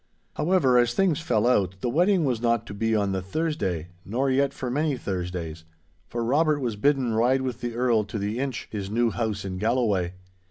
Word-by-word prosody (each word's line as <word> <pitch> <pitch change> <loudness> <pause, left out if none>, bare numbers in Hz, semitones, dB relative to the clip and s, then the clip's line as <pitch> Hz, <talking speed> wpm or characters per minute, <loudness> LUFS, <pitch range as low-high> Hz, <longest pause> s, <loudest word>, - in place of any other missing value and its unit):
However, 150 -8 +3
as 120 0 +2
things 180 -5 +2
fell 120 -9 +1
out, 100 -7 +2
the - - -1
wedding 175 +6 +3
was 125 -4 0
not 115 -1 +1
to - - -8
be 115 +2 0
on 100 -2 +1
the 95 -1 -1
Thursday, 95 - -2
nor 130 +7 0
yet 135 +1 +2
for 130 -3 -5
many 145 0 0
Thursdays, 90 -5 -4 0.4
for 120 +4 -3
Robert 150 +5 +2
was 120 -5 -2
bidden 130 +1 +1
ride 125 +4 +2
with 125 -2 -4
the 120 -1 -4
Earl 120 -3 +2
to 105 +2 -5
the 105 +3 -2
Inch, 135 -6 -3
his 100 -3 -4
new 115 +2 +1
house 105 -4 -2
in 95 -1 -4
Galloway. 105 -6 +1
120 Hz, 200 wpm, -25 LUFS, 100-135 Hz, 0.4 s, However